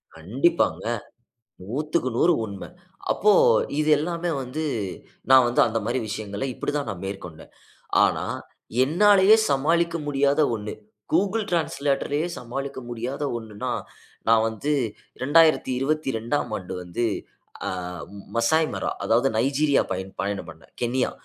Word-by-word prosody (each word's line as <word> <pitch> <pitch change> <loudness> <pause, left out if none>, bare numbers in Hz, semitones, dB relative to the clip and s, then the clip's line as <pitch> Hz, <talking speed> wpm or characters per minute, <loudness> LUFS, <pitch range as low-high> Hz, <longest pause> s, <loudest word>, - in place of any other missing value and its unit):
கண்டிப்பாங்க. 125 - +1 0.8
100க்கு 150 +5 -1
100 175 +6 +4
உண்ம. 100 -3 -7 0.5
அப்போ 210 +1 +4 0.5
இது 155 0 +1
எல்லாமே 170 +2 -2
வந்து 145 +5 -4 0.7
நா 130 - +10
வந்து 120 - +2
அந்த 115 0 -1
மாரி 120 +3 0
விஷயங்கள 105 -1 -5
இப்படி - - -3
தான் 140 -6 -2
நா - - -3
மேற்கொண்டேன். 90 -5 -8 0.5
ஆனா - - 0 0.6
என்னாலேயே 200 +6 +6
சமாளிக்க 170 +5 +2
முடியாத 140 +1 +2
ஒண்ணு, 105 -1 -5 0.4
Google 200 +6 +2
டிரான்ஸ்லேட்டர்லேயே 145 -2 0
சமாளிக்க 135 +3 -5
முடியாத 120 +4 -4
ஒண்ணுன்னா, 110 -3 -5 0.6
நா 115 - +6
வந்து 115 +7 -2 0.5
2022ஆம் 140 -3 +2
ஆண்டு 90 -2 -7
வந்து 90 +7 -2 0.6
ஆ - - -1 0.7
மசாய்மரா 155 +7 +1
அதாவது 120 +4 +3
நைஜீரியா 140 +3 +3
பயண் 95 +1 -5
பயணம் 100 0 -3
பண்ணேன். - - -17
கென்யா, 125 +1 0
135 Hz, 115 wpm, -24 LUFS, 115-155 Hz, 0.8 s, நா